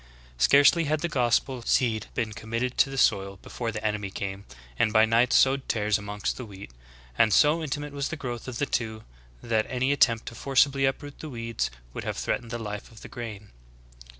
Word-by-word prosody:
'^ -, -, -24 dB, 0.3 s
3. -, -, -27 dB
Scarcely 145 Hz, -, +5 dB
had 150 Hz, +1 st, 0 dB
the 170 Hz, -, 0 dB
gospel 125 Hz, -2 st, +1 dB
seed 115 Hz, -2 st, +1 dB
been 110 Hz, -2 st, -2 dB
committed 115 Hz, +4 st, -3 dB
to -, -, +3 dB
the 135 Hz, -, -6 dB
soil 100 Hz, -5 st, +2 dB
before 115 Hz, -2 st, -4 dB
the 105 Hz, 0 st, -6 dB
enemy 105 Hz, -2 st, -1 dB
came, 95 Hz, +1 st, -5 dB, 0.3 s
and 110 Hz, -, +3 dB
by 110 Hz, +1 st, +5 dB
night 115 Hz, +2 st, +3 dB
sowed 135 Hz, 0 st, +3 dB
tares 105 Hz, -1 st, +1 dB
amongst 105 Hz, 0 st, -3 dB
the 125 Hz, -, -6 dB
wheat; 100 Hz, -, -11 dB, 0.5 s
and 110 Hz, -, +5 dB
so 150 Hz, -, +4 dB
intimate 145 Hz, -1 st, -4 dB
was 140 Hz, -1 st, -2 dB
the -, -, -4 dB
growth 125 Hz, -5 st, -6 dB
of 125 Hz, -2 st, -5 dB
the 145 Hz, -, 0 dB
two 110 Hz, -4 st, -3 dB, 0.4 s
that 110 Hz, -2 st, 0 dB
any 130 Hz, +2 st, 0 dB
attempt 115 Hz, -5 st, +3 dB
to -, -, -7 dB
forcibly 135 Hz, +2 st, +2 dB
uproot 140 Hz, +1 st, -3 dB
the 155 Hz, -, -7 dB
weeds 115 Hz, -3 st, -3 dB, 0.2 s
would -, -, -5 dB
have -, -, -3 dB
threatened 120 Hz, -, -2 dB
the 120 Hz, -, -3 dB
life 105 Hz, -2 st, -6 dB
of 115 Hz, -, -14 dB
the -, -, -9 dB
grain. 110 Hz, -4 st, -8 dB
115 Hz, 205 wpm, -27 LUFS, 110-135 Hz, 0.5 s, Scarcely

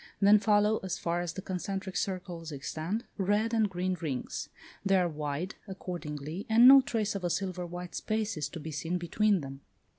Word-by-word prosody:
Then 205 Hz, +1 st, +7 dB
follow 210 Hz, +1 st, +3 dB
as 190 Hz, -2 st, -3 dB
far 170 Hz, +1 st, -1 dB
as 175 Hz, -2 st, -3 dB
the 190 Hz, -, -6 dB
concentric 190 Hz, 0 st, -4 dB
circles 180 Hz, -3 st, -3 dB
extend, 160 Hz, -, -3 dB, 0.2 s
red 205 Hz, +4 st, +1 dB
and 220 Hz, -2 st, +3 dB
green 185 Hz, 0 st, -1 dB
rings. 155 Hz, -7 st, -4 dB, 0.3 s
They 195 Hz, -1 st, +3 dB
are 180 Hz, -1 st, +3 dB
wide, 150 Hz, +3 st, -3 dB
accordingly, 165 Hz, -3 st, -6 dB
and 230 Hz, +3 st, +8 dB
no 270 Hz, +1 st, +10 dB
trace 225 Hz, -6 st, -1 dB
of 200 Hz, -2 st, -4 dB
a 175 Hz, -, +1 dB
silver 185 Hz, -1 st, -2 dB
white 175 Hz, +1 st, -7 dB
space 215 Hz, 0 st, -1 dB
is 155 Hz, -, -3 dB
to 165 Hz, -, -7 dB
be 160 Hz, +1 st, -6 dB
seen 165 Hz, +4 st, -2 dB
between 195 Hz, +3 st, +2 dB
them. 135 Hz, 0 st, -8 dB
185 Hz, 185 wpm, -30 LUFS, 165-205 Hz, 0.3 s, no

